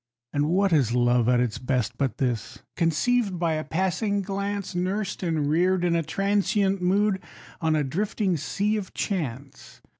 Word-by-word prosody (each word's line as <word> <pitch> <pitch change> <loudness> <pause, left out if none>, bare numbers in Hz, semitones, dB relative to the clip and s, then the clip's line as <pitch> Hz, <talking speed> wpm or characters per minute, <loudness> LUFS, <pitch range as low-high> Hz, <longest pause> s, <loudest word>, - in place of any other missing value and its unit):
And 145 +1 +1
what 190 +1 +2
is 125 -6 +3
love 120 -1 +3
at 125 -1 +4
its 120 -3 -1
best, 125 -4 -1
but 135 -5 -1
this? 120 -5 -2
Conceived 185 +5 +1
by 170 -2 +1
a 155 0 -2
passing 190 +5 0
glance, 200 0 -3
Nursed 190 +3 -2
and 160 -5 0
reared 180 +4 +2
in 170 -1 +2
a 165 - +2
transient 195 +3 +1
mood, 195 +2 +2 0.4
on 160 -1 +2
a 150 - +2
drifting 190 - -1
Sea 205 +8 -1
of 195 -3 -6
Chance. 140 - -4
175 Hz, 160 wpm, -25 LUFS, 145-195 Hz, 0.4 s, at